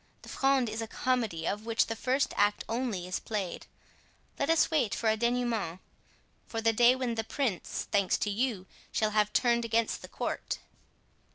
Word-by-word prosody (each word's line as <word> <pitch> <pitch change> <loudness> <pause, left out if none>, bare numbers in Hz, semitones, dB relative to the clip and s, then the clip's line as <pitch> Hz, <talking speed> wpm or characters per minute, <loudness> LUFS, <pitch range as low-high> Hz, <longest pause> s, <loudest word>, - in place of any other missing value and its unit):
The - - -11
Fronde 270 -2 +2
is 220 +1 -3
a 225 - -4
comedy, 225 -10 -1
of 210 +3 -3
which 230 -1 +3
the 225 - -3
first 260 +5 0
act 205 0 +2
only 225 -6 -2
is 185 +1 -2
played. 205 -6 -4 0.7
Let 280 - 0
us 330 0 +4
wait 280 -10 +2
for 220 -1 +2
a - - +2
dénouement—for 230 -2 -4
the 225 0 +3
day 240 +3 +6
when 255 -2 -1
the 225 -1 -1
prince, 225 -5 -2
thanks 200 -3 +2
to 205 - -1
you, 215 -3 -1 0.3
shall 215 -1 +1
have 210 0 +2
turned 235 +1 +3
against 230 0 0
the - - -9
court." - - -3
225 Hz, 175 wpm, -30 LUFS, 210-245 Hz, 0.7 s, day